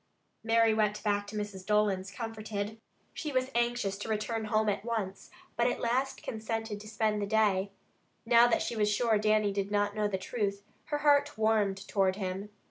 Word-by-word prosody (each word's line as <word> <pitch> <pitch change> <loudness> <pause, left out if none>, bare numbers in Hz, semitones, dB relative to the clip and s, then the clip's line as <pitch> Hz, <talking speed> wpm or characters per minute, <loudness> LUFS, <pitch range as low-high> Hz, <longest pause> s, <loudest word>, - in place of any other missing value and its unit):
Mary 225 0 +4
went 210 -1 0
back 205 -1 0
to 210 - -8
Mrs. 205 -3 -4
Dolan's 200 -2 +1
comforted. 220 0 -5 0.3
She 305 - -4
was 260 0 0
anxious 235 -4 0
to 210 - -5
return 220 +1 -1
home 215 0 +1
at 205 0 0
once, 220 -5 -3 0.3
but 235 +2 +2
at - - -1
last 255 +3 -1
consented 225 -1 -4
to 210 - -11
spend 215 -1 0
the 200 - -1
day. 205 -3 +2 0.6
Now 235 +1 +6
that 240 - +2
she - - -3
was 210 -1 +2
sure 220 0 +2
Dannie 215 -1 +2
did 200 0 -2
not 205 0 0
know 210 -1 +1
the 195 -2 -2
truth, 200 0 -3 0.2
her 295 - -1
heart 290 -1 +3
warmed 205 -3 +1
toward 190 -2 +2
him. 190 +1 -4
215 Hz, 185 wpm, -30 LUFS, 205-225 Hz, 0.6 s, Now